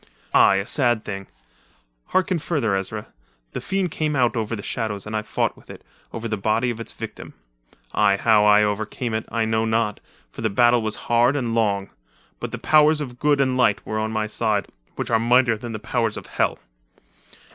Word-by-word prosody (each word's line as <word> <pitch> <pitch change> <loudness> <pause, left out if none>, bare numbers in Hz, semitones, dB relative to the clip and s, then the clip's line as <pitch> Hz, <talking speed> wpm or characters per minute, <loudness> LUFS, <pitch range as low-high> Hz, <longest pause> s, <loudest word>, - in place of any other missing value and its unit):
"Aye, 100 - +6
a 100 0 -1
sad 120 -4 +1
thing. 95 -1 -6 0.8
Harken 185 -1 +1
further, 140 - 0
Ezra. 105 +2 -5 0.4
The - - -5
fiend 190 -3 -1
came 155 -2 -1
out 125 -3 +2
of 110 -2 -2
the 110 -3 -4
shadows 105 -4 -3
and 110 +1 -5
I 110 - 0
fought 105 - -1
with - - -20
it - - -11 0.3
over 115 0 -5
the 110 -1 -2
body 110 +5 +1
of 115 - -7
its 115 - -6
victim. - - -9 0.6
Aye, 100 -2 +3
how 110 0 +4
I 105 0 +6
overcame 110 +3 -2
it, 110 - -2
I 115 -1 0
know 110 0 +1
not, 110 -1 0 0.3
for - - -9
the 110 - +1
battle 120 +3 +4
was 110 -1 -2
hard 120 +3 +3
and 120 -5 -1
long 100 -4 0 0.5
but - - -5
the - - -4
powers 155 0 +4
of 125 -5 -6
good 145 -1 +2
and 130 -2 +2
light 115 -5 +2
were 110 - -2
on 110 0 -2
my 110 -1 -1
side, 105 -3 -1 0.3
which - - -4
are 115 - +4
mightier 120 0 +4
than 115 +2 -7
the 110 - -4
powers 105 - -1
of - - -8
Hell. - - -1
115 Hz, 200 wpm, -23 LUFS, 105-125 Hz, 0.8 s, Aye